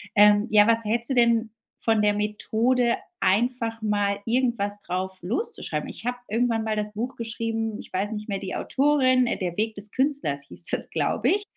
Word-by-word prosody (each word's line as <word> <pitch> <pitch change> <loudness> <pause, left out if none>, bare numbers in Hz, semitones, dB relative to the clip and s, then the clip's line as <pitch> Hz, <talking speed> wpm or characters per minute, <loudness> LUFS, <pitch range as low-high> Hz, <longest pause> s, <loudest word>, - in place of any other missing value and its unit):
Ähm, 210 +1 +6
ja, 210 -1 +6
was 230 0 +3
hältst 230 +2 0
du - - +3
denn 235 -2 +3 0.3
von 225 -2 +1
der 210 0 +3
Methode, 230 +4 +1 0.2
einfach 230 +2 +1
mal 205 -1 +1
irgendwas 230 -4 0
drauf 185 +1 -3
loszuschreiben? 255 - -2
Ich - - -9
habe 245 0 -1
irgendwann 230 +1 +1
mal 220 -1 -1
das 210 0 -2
Buch 240 +5 -4
geschrieben, 225 -1 -3
ich - - -12
weiß 195 +3 -1
nicht 210 -1 -5
mehr, 200 -3 -2
die 190 - -5
Autorin, 260 -3 +2
äh, - - -1
der 180 -2 -3
Weg 220 +2 -1
des 205 +1 -8
Künstlers 265 - -1
hieß - - -6
das, - - -1
glaube - - 0
ich. 405 +1 +2
225 Hz, 185 wpm, -25 LUFS, 205-240 Hz, 0.3 s, Ähm